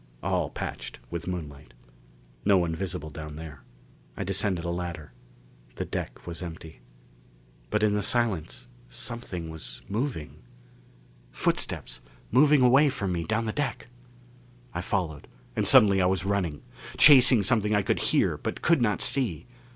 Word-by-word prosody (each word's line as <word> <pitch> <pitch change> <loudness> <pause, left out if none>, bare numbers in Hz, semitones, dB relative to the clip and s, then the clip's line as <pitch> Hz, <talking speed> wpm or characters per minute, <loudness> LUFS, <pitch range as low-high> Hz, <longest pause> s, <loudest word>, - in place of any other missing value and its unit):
All - - 0
patched - - -6
with 85 0 -5
moonlight. 75 -7 -6 0.7
No 100 -1 +5
one 85 -2 0
visible 80 -3 -4
down 75 0 -8
there. 75 -3 -9 0.6
I - - -2
descended 95 -2 -1
a 85 - -1
ladder. 85 -3 -5 0.6
The - - -3
deck - - -6
was 85 -1 -6
empty. 80 -3 -8 0.9
But 105 0 0
in 105 -1 +3
the 105 - +1
silence 105 - -1 0.2
something 90 - -5
was 80 -7 -7
moving! 110 - -4 0.9
Footsteps - - -1 0.3
moving 140 +3 +5
away 135 +4 +6
from 100 -7 -2
me 85 -2 -2
down 110 +1 0
the 110 - -1
deck! 130 -4 -3 0.8
I 85 - -2
followed; 85 -6 -3 0.3
and - - +2
suddenly 100 -2 +6
I 90 - +3
was 95 -1 0
running. 95 -7 -1 0.3
Chasing 130 -6 +8
something 105 0 +2
I 100 - +2
could - - 0
hear, - - +2
but - - -5
could 170 -5 +4
not 105 -3 +1
see. 100 - -1
95 Hz, 145 wpm, -27 LUFS, 80-110 Hz, 0.9 s, Chasing